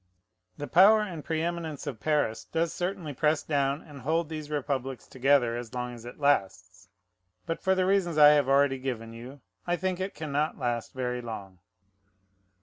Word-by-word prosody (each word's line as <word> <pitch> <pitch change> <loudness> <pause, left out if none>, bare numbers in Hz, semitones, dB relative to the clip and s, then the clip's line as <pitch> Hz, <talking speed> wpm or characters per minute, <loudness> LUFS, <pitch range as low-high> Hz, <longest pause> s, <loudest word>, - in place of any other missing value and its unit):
The 145 - -4
power 200 +7 +6
and 175 -8 -5
preëminence 165 -2 -3
of 135 -7 -5
Paris 145 -7 0
does 165 0 -1
certainly 180 -4 -3
press 150 +3 +1
down 140 -1 0
and 145 -3 -12
hold 160 +4 0
these 155 -2 -6
republics 135 -3 -3
together 130 -2 +2
as 120 0 -7
long 125 0 -3
as 120 -1 -11
it 120 - -9
lasts: 95 -9 0 0.6
but, 165 - -3
for 190 0 +2
the 185 0 +2
reasons 185 -4 +1
I 150 -1 +9
have 145 -3 +4
already 135 -1 +3
given 115 -4 -4
you, 125 +4 -10 0.3
I 175 - +2
think 185 0 -2
it 190 +1 -4
can 155 -1 -6
not 150 +3 0
last 120 -3 -2
very 125 -1 -2
long. 100 -6 -8
145 Hz, 175 wpm, -28 LUFS, 125-165 Hz, 0.6 s, I